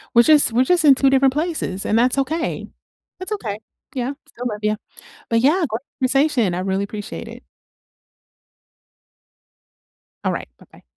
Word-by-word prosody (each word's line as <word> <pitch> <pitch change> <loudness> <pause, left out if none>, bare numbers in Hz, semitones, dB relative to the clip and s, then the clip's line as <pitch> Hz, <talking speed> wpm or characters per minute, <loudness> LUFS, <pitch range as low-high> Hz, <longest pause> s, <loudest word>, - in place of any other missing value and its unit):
we're 235 - +8
just 300 -2 +5
we're 240 +3 +3
just 345 +4 +2
in 285 -3 +7
two 270 +1 +3
different 270 0 +4
places, 300 - -2
and 215 - +1
that's 250 +3 +2
okay. 315 +5 -1 0.5
That's 370 +3 -5
okay. 215 - -4 0.3
Yeah. 255 0 -2 0.2
Still 250 -3 -7
love 210 -3 -3
ya. 210 0 +1 0.5
But, 230 0 +2
yeah, 315 +8 +3
gr 220 - -2 0.2
conversation. 260 - +2
I 180 - -2
really 190 +1 -1
appreciate 205 +1 -7
it. - - -11 2.8
Alright. - - -2
Bye-bye. - - -20
255 Hz, 150 wpm, -21 LUFS, 215-295 Hz, 2.8 s, we're